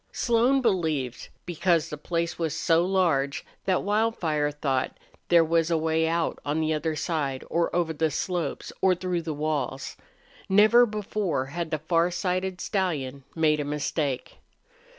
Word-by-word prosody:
Slone 245 +3 +2
believed, 160 - -1 0.2
because 170 -1 +1
the - - -3
place 170 +3 -2
was 165 -1 -1
so 165 +1 +3
large, 170 -7 +1 0.2
that 190 -2 +1
Wildfire 200 -8 +1
thought 140 -3 -2 0.3
there 170 -1 +6
was 165 0 +2
a 165 - +2
way 160 0 +1
out 165 0 0
on 150 +2 -1
the 160 0 +1
other 155 +1 -1
side 150 -4 -2
or 170 0 +2
over 170 -2 +1
the 160 +1 +1
slopes 175 +2 -3
or 190 -1 +4
through 180 -1 -2
the 160 -1 -4
walls. 145 -3 -3 0.5
Never 215 +5 +6
before 205 - -2
had 170 -1 -3
the 155 - -1
farsighted 180 +3 0
stallion 140 -9 -2
made 155 -2 +3
a - - 0
mistake. 145 -2 -2
165 Hz, 150 wpm, -26 LUFS, 150-185 Hz, 0.5 s, there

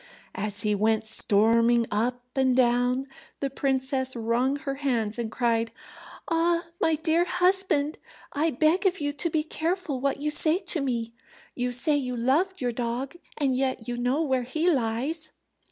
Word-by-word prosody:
As 210 0 -3
he 210 -1 +1
went 220 +2 +1
storming 230 +2 +4
up 245 +4 -1
and 260 -2 +2
down, 250 +1 +2 0.3
the 275 -1 -2
princess 265 -1 -1
wrung 235 +4 0
her 275 -1 -4
hands, 235 -5 -1
and 225 -2 -3
cried, 230 -1 0 0.6
"Ah, 335 +1 +1 0.2
my 320 - +3
dear 320 +2 +1
husband, 360 -4 +1 0.3
I 305 +3 +1
beg 320 +7 +2
of 375 0 -1
you 290 0 -2
to 295 +4 -1
be 315 -1 0
careful 320 -3 -3
what 275 0 -1
you 300 +1 -1
say 310 +2 +6
to 360 -4 -2
me. 235 -4 -3 0.4
You 245 0 -2
say 290 +5 +4
you 250 -3 -3
loved 315 +10 0
your 245 -1 0
dog, 245 +5 -4 0.2
and 275 -4 +1
yet 260 -3 -2
you 245 - -3
know 250 +6 0
where 265 -4 0
he 310 +8 -2
lies." 270 +5 -2
265 Hz, 165 wpm, -26 LUFS, 240-310 Hz, 0.6 s, say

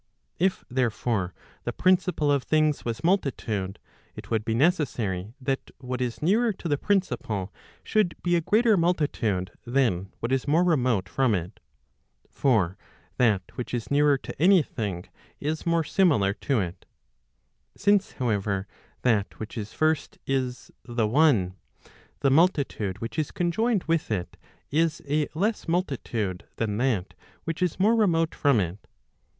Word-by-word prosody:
If 185 +2 +1
therefore 115 -6 0 0.3
the - - -2
principle 180 -5 +2
of 140 -1 +2
things 155 +1 +1
was 115 -1 -4
multitude, 115 - 0 0.4
it - - -10
would 110 -2 +1
be 110 0 -1
necessary 120 - 0
that 135 0 -2
what 125 0 -5
is 120 +1 -3
nearer 220 +7 +3
to 180 - -7
the 145 - +2
principle 130 - -1 0.3
should 215 -6 +1
be 175 0 +2
a 170 - +2
greater 220 +6 +4
multitude 145 - 0
than 115 -8 0
what 115 - -3
is 135 +1 0
more 160 +5 +4
remote 125 - +2
from 130 -3 +2
it. 90 0 -5 0.7
For 105 -8 +1 0.4
that 110 -6 +3
which 125 0 -4
is 120 +2 -5
nearer 145 0 +4
to 135 - -9
any 185 -1 +6
thing 100 -9 -4 0.3
is 155 +3 -3
more 170 -1 +3
similar 145 - +3
to 130 +3 0
it. 90 -2 -5 0.9
Since 205 0 +2
however, 100 -5 -1 0.4
that 110 -5 +1
which 110 - -7
is 110 -2 -5
first 155 0 0
is 130 -2 -2
the 120 -2 -1
one, 115 - +3 0.7
the 135 - +3
multitude 140 - +2
which 115 +7 -4
is 155 - -1
conjoined 200 +4 0
with 165 -2 0
it, 95 -5 -3 0.4
is 160 +1 +1
a 150 +1 +1
less 210 +5 -1
multitude 120 - -2
than 105 -2 -1
that 115 -7 0 0.3
which 165 0 -4
is 180 -1 0
more 215 +5 +4
remote 165 -7 +2
from 140 -6 +3
it. 90 +1 -4
135 Hz, 145 wpm, -26 LUFS, 110-165 Hz, 0.9 s, any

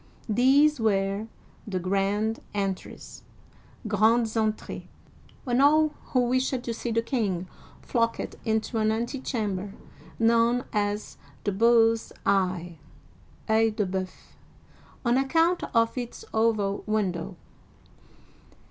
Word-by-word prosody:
These 270 +6 +4
were 200 -1 0 0.2
" - - -29
the 185 - 0
grand 200 +4 0 0.2
entries 195 -2 -4 0.3
*' - - -15
(grandes 220 +2 +3
entr^es)y 220 -1 -2 0.6
when 245 0 +1
all 310 +2 +5 0.2
who 255 - +1
wished 255 +1 0
to 235 - -3
see 235 - -4
the 230 0 +1
king 200 -8 -1 0.4
flocked 230 -1 -1
into 220 0 -1
an 215 0 +2
antechamber, 220 -5 -3 0.4
known 230 +2 +3
as 205 0 -2 0.3
the 205 - 0
Bull's 225 +2 +3
Eye 180 -4 0 0.7
(CEil 220 0 +3
de 210 -2 0
Bceuf) 185 0 -3 0.9
on 240 +1 +3
account 330 +6 +2
of 230 -1 +2
its 245 -2 -6
oval 215 -3 +1
window. 190 -5 -1
220 Hz, 110 wpm, -26 LUFS, 200-240 Hz, 0.9 s, all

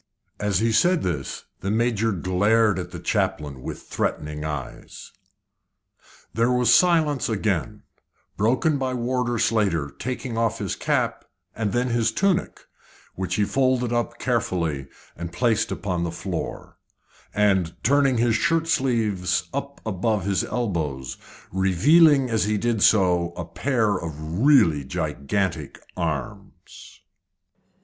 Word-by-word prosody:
As 105 -3 0
he 115 +3 +1
said 175 +10 +3
this 80 -7 -3
the 95 - -3
Major 115 0 +1
glared 100 +3 +2
at 90 0 -5
the - - -8
chaplain 70 -3 -2
with - - -7
threatening 75 0 -3
eyes. 75 -4 -7 1.2
There 115 +2 +2
was 125 -1 +4
silence 160 -7 +3
again, 100 - -2 0.5
broken 130 +7 +1
by 130 -1 -1
Warder 125 0 -1
Slater 100 -11 +1
taking 125 -2 -4
off 115 -1 0
his 100 -4 -3
cap - - -1 0.3
and 105 -3 -1
then 125 +3 0
his 115 -1 +1
tunic, 195 - 0 0.5
which 90 -1 -3
he 105 - +2
folded 130 -1 +1
up 120 0 -1
carefully 85 - -1 0.3
and 85 +1 -6
placed 110 +3 +1
upon 90 -4 -2
the 85 - -1
floor, - - -6 0.5
and 95 -5 +1
turning 135 -1 +3
his 115 0 +2
shirt 165 +1 +1
sleeves 115 - 0
up 140 +1 -5
above 105 -1 -1
his 100 -2 +1
elbows, 80 - -3 0.3
revealing 135 - +4
as 110 -4 +1
he 105 0 0
did 115 0 0
so 90 -5 +3
a 85 -1 -6
pair 105 - 0
of 80 -3 -6 0.2
really 110 - +5
gigantic 80 +2 -2 0.2
arms. 80 -8 -6
105 Hz, 125 wpm, -24 LUFS, 90-125 Hz, 1.2 s, really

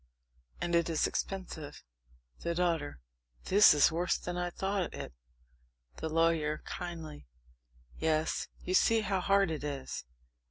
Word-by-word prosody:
And 175 - -2
it 170 0 +3
is 160 -2 +2
expensive. 170 -6 -4 0.6
THE 170 0 -2
DAUGHTER. 165 - 0 0.4
This 205 +2 +7
is 145 - +5
worse 175 +3 +1
than 175 - -5
I 175 0 -1
thought 190 +1 -2
it! - - -7 0.8
THE 160 - -3
LAWYER 160 -1 +1
(kindly). 165 - -7 0.7
Yes, 160 0 0 0.2
you 185 - -2
see 225 +4 +4
how 195 -2 0
hard 195 -1 +3
it 155 -2 -4
is. 140 -3 -4
170 Hz, 130 wpm, -32 LUFS, 155-180 Hz, 0.8 s, This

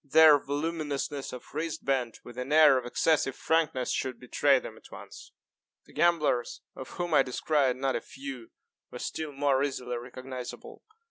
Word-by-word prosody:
Their 150 +1 +7
voluminousness 145 -1 -3
of 125 - -10
wristband, 135 -6 -2
with 120 - -11
an 125 +3 -5
air 155 -2 +7
of 120 - -7
excessive 135 0 +1
frankness, 160 -6 0
should 130 -2 -2
betray 135 +2 +3
them 115 -3 -7
at - - -17
once. - - -11 0.5
The - - -19
gamblers, 155 -8 +1
of 130 - -8
whom 175 -2 -2
I 150 - +7
descried 135 0 +1
not 135 +1 -1
a - - -2
few, 135 -4 -9 0.4
were - - -8
still 155 -2 -4
more 140 -1 +1
easily 125 -3 -3
recognisable. 125 +1 -8
135 Hz, 155 wpm, -29 LUFS, 125-150 Hz, 0.5 s, Their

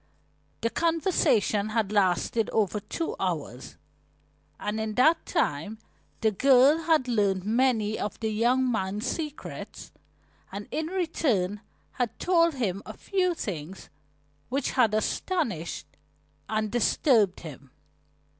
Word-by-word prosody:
The 230 - 0
conversation 325 - +1
had 215 -2 0
lasted 205 +2 +1
over 210 -1 0
two 330 - -4
hours, - - -4 0.8
and 210 +1 -3
in 220 -1 -3
that 315 +6 +3
time 160 +10 -1 0.4
the 220 -1 +3
girl 270 - +5
had 315 -6 +3
learned 200 -5 +1
many 220 -2 +1
of 210 - -4
the 220 -1 -1
young 245 +4 +2
man's 210 0 -2
secrets, 300 +2 -6 0.6
and 200 +1 -7
in 315 0 -2
return 265 - 0 0.3
had 245 -3 -3
told 335 -3 +3
him 200 -7 -2
a - - -8
few 365 -3 0
things 185 - -6 0.6
which 270 +1 -1
had 230 -5 +3
astonished 215 - -2 0.6
and 215 -1 -1
disturbed 235 - +2
him. 140 -4 -10
225 Hz, 115 wpm, -27 LUFS, 205-280 Hz, 0.8 s, girl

